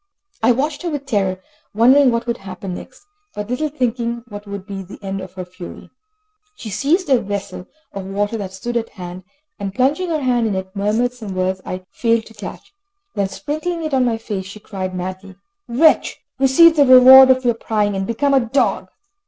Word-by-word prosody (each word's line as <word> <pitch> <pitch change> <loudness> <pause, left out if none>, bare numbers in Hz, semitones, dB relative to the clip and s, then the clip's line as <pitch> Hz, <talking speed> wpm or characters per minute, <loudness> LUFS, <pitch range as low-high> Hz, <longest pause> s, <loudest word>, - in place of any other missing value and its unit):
I 225 +2 +4
watched 285 +5 -1
her 350 - -2
with 290 -3 -4
terror, 195 -7 0 0.4
wondering 260 +5 +6
what 235 0 -1
would 235 0 -2
happen 190 -1 -7
next, 260 - -11 0.3
but 210 +3 -5
little 305 +5 -1
thinking 235 -4 -2
what 205 -1 -9
would 200 -1 -7
be 195 -1 -6
the 190 +1 -11
end 195 0 -4
of 185 - -10
her 185 -1 -6
fury. 180 0 -11 0.6
She 220 - -8
seized 320 - +1
a 255 - +4
vessel 200 -2 -5 0.3
of 195 -1 -6
water 205 +3 -1
that 195 -3 -5
stood 235 +6 -4
at 230 -1 -3
hand, 180 -1 -9 0.4
and 200 -1 -5
plunging 290 +9 +1
her 315 -2 -1
hand 245 -3 +1
in 205 - -1
it, 190 +1 -5
murmured 215 +5 0
some 215 -6 -8
words 185 0 -1
I 185 0 -5
failed 230 -1 +1
to 225 - -15
catch. 220 - -9 0.4
Then, 195 -1 -1
sprinkling 310 - -4
it 310 -2 -3
on 260 -1 +3
my 235 -2 0
face, 205 -4 -5
she 205 +2 -10
cried 185 -3 -5
madly: 185 +1 -6 0.3
"Wretch, 300 +7 +3 0.2
receive 310 +5 +6
the 285 - +6
reward 260 +1 +9
of 255 0 +3
your 240 - +4
prying, 210 -3 -1
and 195 0 -2
become 280 +5 0
a 270 - +6
dog." 250 +3 0
225 Hz, 200 wpm, -19 LUFS, 195-260 Hz, 0.6 s, reward